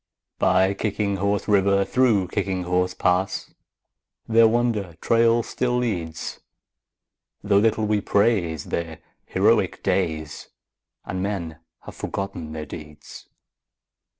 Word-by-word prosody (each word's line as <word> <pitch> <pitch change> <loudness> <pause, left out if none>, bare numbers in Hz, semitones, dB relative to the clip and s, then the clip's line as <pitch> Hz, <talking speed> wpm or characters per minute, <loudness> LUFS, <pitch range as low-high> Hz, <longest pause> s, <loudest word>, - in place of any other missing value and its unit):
By 95 +1 +3
Kicking 100 -1 -1
Horse 100 +1 -1
River, 100 -1 +3
through 110 -5 +2
Kicking 95 -2 -2
Horse 90 +1 0
Pass, 90 +2 0 0.7
Their 115 0 +6
wonder 110 -6 0
trail 115 0 +3
still 125 +1 -1
leads, 85 -10 -3 1.0
Though 100 -1 +4
little 110 0 +2
we 105 -1 +1
praise 100 -8 +1
their 85 -2 -4 0.3
heroic - - +2
days 80 -5 -2 0.6
And 90 0 -4
men 85 -5 -3 0.2
have - - -10
forgotten 85 -5 -5
their 80 -1 -5
deeds. 75 0 -11
100 Hz, 110 wpm, -23 LUFS, 85-110 Hz, 1.0 s, Their